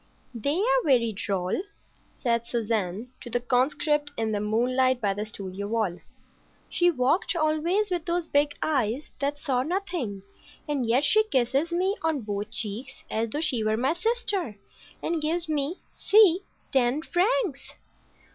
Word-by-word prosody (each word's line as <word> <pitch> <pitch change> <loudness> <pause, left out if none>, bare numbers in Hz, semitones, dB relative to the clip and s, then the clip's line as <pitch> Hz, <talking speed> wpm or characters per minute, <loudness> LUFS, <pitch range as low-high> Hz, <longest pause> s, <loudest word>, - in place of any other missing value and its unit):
"They 280 +7 -1
are - - +3
very 240 -5 +3
droll," 195 - -1 0.6
said 235 -2 0
Suzanne 225 -1 -2
to 240 - -8
the 245 - +1
conscript 290 +4 +1
in 225 -1 0
the 210 - 0
moonlight 250 +4 +2
by 205 -4 +1
the 210 +2 -4
studio 200 -1 -6
wall. 210 -5 -1 0.7
"She 350 0 +4
walked 300 +5 +1
always 335 +6 +1
with 350 -2 -1
those 345 0 0
big 290 0 +1
eyes 265 -2 0
that 285 +1 -1
saw 265 -4 0
nothing, 310 - -3 0.4
and 280 -5 -1
yet 245 +5 +3
she 435 +8 +5
kisses 275 - +1
me 370 +4 +1
on 320 -4 0
both 205 -1 -4
cheeks 225 +3 -4
as 225 +1 0
though 295 +7 -2
she 255 -8 +1
were 215 0 +1
my 260 +6 +2
sister, 390 - -1 0.5
and 330 -1 -1
gives 330 +3 -1
me—see—ten 310 - +2
francs!" 390 - 0
270 Hz, 145 wpm, -26 LUFS, 225-335 Hz, 0.7 s, she